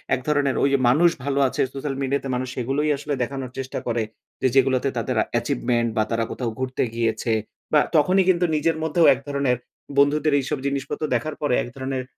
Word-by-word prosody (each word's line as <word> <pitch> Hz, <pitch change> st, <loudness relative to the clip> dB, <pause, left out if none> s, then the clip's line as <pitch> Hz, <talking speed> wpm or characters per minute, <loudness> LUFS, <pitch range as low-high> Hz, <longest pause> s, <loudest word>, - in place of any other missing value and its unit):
এক 130 Hz, -, -6 dB
ধরনের 145 Hz, -2 st, +2 dB
ওই 140 Hz, -, +4 dB, 0.2 s
মানুষ 160 Hz, +8 st, +5 dB
ভালো 140 Hz, 0 st, 0 dB
আছে। -, -, -2 dB
সোশ্যাল 135 Hz, 0 st, -4 dB
মিডিয়াতে 135 Hz, 0 st, -1 dB
মানুষ 130 Hz, 0 st, -3 dB
এগুলোই 140 Hz, +5 st, 0 dB
আসলে 145 Hz, +1 st, -4 dB
দেখানোর 130 Hz, 0 st, -5 dB
চেষ্টা 130 Hz, 0 st, -4 dB
করে। 115 Hz, -1 st, 0 dB, 0.4 s
যে -, -, +4 dB
যেগুলোতে 135 Hz, 0 st, +3 dB
তাদের 115 Hz, +1 st, -1 dB, 0.2 s
অ্যাচিভমেন্ট 120 Hz, -1 st, 0 dB
বা 110 Hz, -, +4 dB
তারা 115 Hz, 0 st, +1 dB
কোথাও 120 Hz, -3 st, -3 dB
ঘুরতে 130 Hz, 0 st, -1 dB
গিয়েছে 115 Hz, 0 st, 0 dB, 0.4 s
বা 150 Hz, -, +7 dB, 0.2 s
তখনই 185 Hz, +6 st, +4 dB
কিন্তু 175 Hz, -1 st, +3 dB
নিজের 160 Hz, +1 st, +1 dB
মধ্যেও 160 Hz, +1 st, +3 dB
এক 130 Hz, -, -6 dB
ধরনের 140 Hz, -3 st, 0 dB, 0.4 s
বন্ধুদের 145 Hz, +1 st, +3 dB
এইসব 135 Hz, +2 st, -2 dB
জিনিসপত্র 140 Hz, +2 st, -3 dB
দেখার 150 Hz, +6 st, -2 dB
পরে 145 Hz, -4 st, +1 dB
এক -, -, -7 dB
ধরনের 130 Hz, -1 st, -3 dB
135 Hz, 180 wpm, -23 LUFS, 125-145 Hz, 0.4 s, বা